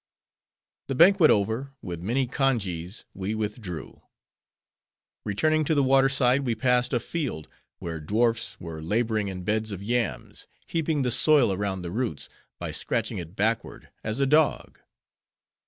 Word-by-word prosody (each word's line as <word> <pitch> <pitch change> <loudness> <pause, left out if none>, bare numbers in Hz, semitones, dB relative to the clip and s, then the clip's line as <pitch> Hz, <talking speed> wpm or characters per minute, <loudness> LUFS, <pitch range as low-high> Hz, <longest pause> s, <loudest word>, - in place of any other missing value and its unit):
The 135 - -2
banquet 175 +2 +6
over, 110 +6 +1
with 85 -2 -6
many 120 +8 0
congees, 110 - -2
we 100 +3 -3
withdrew. 105 - -5 1.2
Returning 155 +10 +1
to 160 - +1
the 140 - +3
water 135 0 +4
side, 130 0 +2
we 120 -4 -1
passed 125 0 +2
a 120 - +2
field, 120 - -4 0.3
where 80 -2 -5
dwarfs 115 +8 0
were 80 -2 -7
laboring 110 +4 0
in 95 -2 -5
beds 110 +3 -1
of 100 -1 -6
yams, 120 +2 -3 0.2
heaping 160 -3 -1
the 125 - 0
soil 140 -5 +4
around 95 -1 -3
the 85 - -5
roots, 120 +3 -3 0.3
by - - -4
scratching - - -2
it 85 +1 -9
backward; 110 +3 -1
as 110 +3 -3
a 140 - +3
dog. 150 +2 +2
115 Hz, 145 wpm, -26 LUFS, 95-135 Hz, 1.2 s, banquet